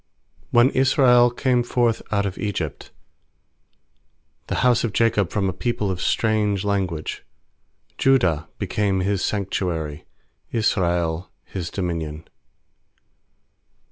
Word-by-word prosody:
When 120 Hz, +3 st, +5 dB
Israel 130 Hz, -2 st, +5 dB
came 125 Hz, 0 st, +1 dB
forth 120 Hz, -1 st, +1 dB
out 100 Hz, -1 st, +1 dB
of 95 Hz, -2 st, -4 dB
Egypt, 90 Hz, -8 st, -4 dB, 1.6 s
The -, -, -2 dB
house 125 Hz, -2 st, +4 dB
of 115 Hz, -4 st, -2 dB
Jacob 110 Hz, -5 st, +2 dB
from 100 Hz, 0 st, -1 dB
a 95 Hz, -, -1 dB
people 105 Hz, 0 st, -1 dB
of 90 Hz, -1 st, -4 dB
strange 105 Hz, -3 st, +1 dB
language; 95 Hz, -6 st, -2 dB, 0.8 s
2Judah 90 Hz, -, +3 dB
became 100 Hz, -1 st, 0 dB
His 100 Hz, 0 st, 0 dB
sanctuary, 90 Hz, -7 st, -2 dB, 0.5 s
Israel 85 Hz, -6 st, 0 dB, 0.2 s
His 90 Hz, -3 st, -5 dB
dominion. 85 Hz, -4 st, -4 dB
100 Hz, 105 wpm, -22 LUFS, 90-115 Hz, 1.6 s, When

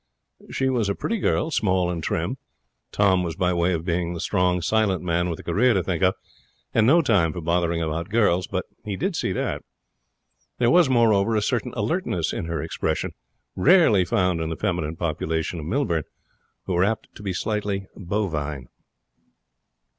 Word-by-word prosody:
She 135 Hz, -, -1 dB
was 120 Hz, -6 st, +1 dB
a 100 Hz, -, 0 dB
pretty 230 Hz, -1 st, -2 dB
girl, 165 Hz, -3 st, 0 dB
small 95 Hz, -, +1 dB
and 85 Hz, -2 st, -4 dB
trim. -, -, -2 dB, 0.5 s
Tom 95 Hz, -3 st, +3 dB
was 85 Hz, -2 st, -3 dB
by 90 Hz, -1 st, +1 dB
way 85 Hz, +1 st, +1 dB
of 85 Hz, -2 st, -2 dB
being 85 Hz, -1 st, -1 dB
the -, -, -5 dB
strong, 90 Hz, 0 st, +1 dB
silent 100 Hz, +1 st, +1 dB
man 85 Hz, 0 st, 0 dB
with 85 Hz, -, -3 dB
a -, -, -11 dB
career 125 Hz, +2 st, +2 dB
to 95 Hz, -, +1 dB
think 90 Hz, -3 st, -2 dB
of 95 Hz, 0 st, +3 dB, 0.6 s
and 110 Hz, -1 st, +4 dB
no 165 Hz, +5 st, +5 dB
time 100 Hz, -, +3 dB
for -, -, -5 dB
bothering 85 Hz, 0 st, 0 dB
about 80 Hz, +3 st, -3 dB
girls, 100 Hz, -5 st, +2 dB
but -, -, -3 dB, 0.2 s
he 100 Hz, -2 st, -4 dB, 0.2 s
saw 160 Hz, -, -1 dB
that. -, -, -2 dB, 1.0 s
There 120 Hz, -1 st, +3 dB
was, 175 Hz, -4 st, +5 dB
moreover, 115 Hz, -3 st, +3 dB
a 105 Hz, -, +2 dB
certain -, -, -1 dB
alertness -, -, -1 dB
in -, -, -3 dB
her 85 Hz, -3 st, -3 dB
expression -, -, -2 dB, 0.4 s
rarely 130 Hz, -, +5 dB
found 90 Hz, -4 st, +1 dB
in 80 Hz, -, -2 dB
the 80 Hz, -, -4 dB
feminine 80 Hz, +1 st, -2 dB
population 80 Hz, 0 st, -2 dB
of 75 Hz, -, -6 dB
Millbourne, 85 Hz, -, 0 dB, 0.6 s
who 95 Hz, -, -2 dB
were 90 Hz, +1 st, +3 dB
apt 110 Hz, +3 st, -2 dB
to -, -, -12 dB
be 100 Hz, -2 st, -3 dB
slightly 100 Hz, +1 st, -2 dB
bovine. 80 Hz, -, -3 dB
90 Hz, 175 wpm, -24 LUFS, 85-110 Hz, 1.0 s, no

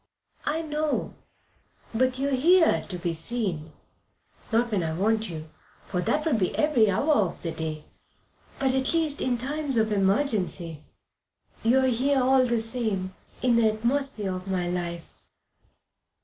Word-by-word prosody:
"I 320 Hz, +2 st, 0 dB
know. 305 Hz, -1 st, -2 dB, 0.8 s
But 255 Hz, +2 st, +1 dB
you 275 Hz, +1 st, 0 dB
are -, -, -3 dB
here 330 Hz, +6 st, +4 dB
to 180 Hz, -, -4 dB
be 170 Hz, -1 st, -2 dB
seen 165 Hz, -3 st, -2 dB, 0.8 s
not 235 Hz, +1 st, +1 dB
when 200 Hz, -4 st, +1 dB
I 160 Hz, -1 st, -2 dB
want 215 Hz, +4 st, 0 dB
you, 155 Hz, -2 st, -8 dB, 0.3 s
for 180 Hz, -2 st, -2 dB
that 300 Hz, -, 0 dB
would 290 Hz, -9 st, +1 dB
be 185 Hz, -, 0 dB
every 265 Hz, -9 st, +3 dB
hour 280 Hz, +11 st, +2 dB
of 205 Hz, -9 st, 0 dB
the 165 Hz, -, -1 dB
day 155 Hz, -1 st, -4 dB, 0.7 s
but, 265 Hz, -1 st, +1 dB
at 265 Hz, +4 st, +1 dB
least, 315 Hz, -3 st, +1 dB
in 245 Hz, -1 st, 0 dB
times 275 Hz, +1 st, -1 dB
of 220 Hz, -1 st, +2 dB
emergency. 195 Hz, -, 0 dB, 0.8 s
You 250 Hz, +4 st, +3 dB
are -, -, +2 dB
here, 260 Hz, +3 st, +2 dB
all 260 Hz, +1 st, +4 dB
the 235 Hz, -2 st, +1 dB
same, 220 Hz, -5 st, -1 dB, 0.3 s
in 245 Hz, -2 st, +3 dB
the 225 Hz, -2 st, +4 dB
atmosphere 235 Hz, -3 st, -1 dB
of 185 Hz, +1 st, -8 dB
my 185 Hz, -2 st, -1 dB
life." 170 Hz, -1 st, -5 dB
225 Hz, 155 wpm, -26 LUFS, 185-265 Hz, 0.8 s, here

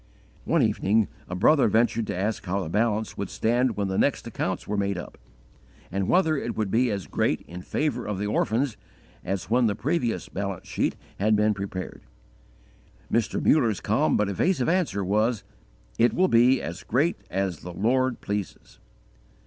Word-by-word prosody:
_ -, -, -31 dB, 0.4 s
One -, -, +3 dB
evening 105 Hz, +2 st, +2 dB, 0.2 s
a 90 Hz, -, -3 dB
brother 140 Hz, +10 st, +4 dB
ventured 115 Hz, +1 st, +2 dB
to -, -, -3 dB
ask 105 Hz, +3 st, -1 dB
how 95 Hz, +2 st, -1 dB
the 80 Hz, -, -5 dB
balance 110 Hz, +2 st, 0 dB
would 100 Hz, -, -3 dB
stand 120 Hz, 0 st, +1 dB
when 100 Hz, -1 st, 0 dB
the 95 Hz, 0 st, -1 dB
next -, -, +1 dB
accounts -, -, -3 dB
were 105 Hz, -, -2 dB
made 100 Hz, -1 st, 0 dB
up, 85 Hz, -, -7 dB, 0.8 s
and 95 Hz, 0 st, -1 dB
whether 160 Hz, -4 st, +3 dB
it 120 Hz, -5 st, -3 dB
would 105 Hz, -3 st, -1 dB
be 125 Hz, +2 st, +3 dB
as 100 Hz, -4 st, -3 dB
great -, -, 0 dB
in 90 Hz, +1 st, -9 dB
favour 125 Hz, +2 st, -2 dB
of 105 Hz, -2 st, -2 dB
the 100 Hz, -, -2 dB
orphans 115 Hz, +4 st, 0 dB, 0.5 s
as 95 Hz, 0 st, -4 dB
when 120 Hz, 0 st, +4 dB
the 105 Hz, -, 0 dB
previous 125 Hz, -1 st, -1 dB
balance 100 Hz, -2 st, -5 dB
sheet -, -, -1 dB, 0.2 s
had 105 Hz, +2 st, +3 dB
been 105 Hz, +1 st, +3 dB
prepared. 95 Hz, -2 st, -6 dB, 1.1 s
Mr. 115 Hz, -1 st, +1 dB
Mutter's 120 Hz, -10 st, +3 dB
calm -, -, +2 dB
but 105 Hz, -, +1 dB
evasive 130 Hz, -, +1 dB
answer 165 Hz, -, +1 dB
was: 110 Hz, +3 st, +1 dB, 0.6 s
_"It 120 Hz, +1 st, +4 dB
will 185 Hz, +1 st, +3 dB
be 120 Hz, +3 st, +5 dB
as 85 Hz, +3 st, -5 dB
great 145 Hz, -, +1 dB
as 95 Hz, -4 st, -2 dB
the 90 Hz, -, -8 dB
Lord 125 Hz, +7 st, +1 dB
pleases." 100 Hz, -2 st, -5 dB
110 Hz, 175 wpm, -26 LUFS, 100-120 Hz, 1.1 s, be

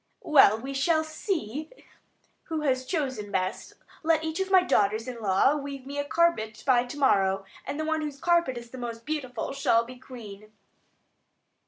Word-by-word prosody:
"Well, 265 Hz, -8 st, +6 dB
we 265 Hz, +4 st, -6 dB
shall 315 Hz, +3 st, +2 dB
see 310 Hz, -, -3 dB, 0.8 s
who 320 Hz, -2 st, -3 dB
has 260 Hz, -3 st, 0 dB
chosen 260 Hz, -, -2 dB
best. 185 Hz, -1 st, -2 dB, 0.3 s
Let 320 Hz, -1 st, +2 dB
each 320 Hz, +2 st, -3 dB
of 380 Hz, 0 st, -1 dB
my 375 Hz, -1 st, +6 dB
daughters 215 Hz, -, +1 dB
in 245 Hz, -2 st, -6 dB
law 200 Hz, +8 st, +3 dB
weave 280 Hz, -2 st, -6 dB
me 285 Hz, +1 st, -5 dB
a -, -, +1 dB
carpet 285 Hz, -7 st, +1 dB
by 250 Hz, -2 st, +4 dB
to 250 Hz, +4 st, -8 dB
morrow, 195 Hz, -8 st, +2 dB, 0.2 s
and 290 Hz, -, -4 dB
the 310 Hz, -, -1 dB
one 315 Hz, 0 st, 0 dB
whose 295 Hz, -2 st, -5 dB
carpet 340 Hz, -6 st, +2 dB
is 235 Hz, 0 st, -9 dB
the 260 Hz, -, -8 dB
most 230 Hz, -1 st, -6 dB
beautiful 275 Hz, -6 st, -3 dB
shall 235 Hz, -4 st, +2 dB
be 255 Hz, +1 st, -10 dB
queen." 215 Hz, -5 st, -11 dB
265 Hz, 175 wpm, -27 LUFS, 230-310 Hz, 0.8 s, Well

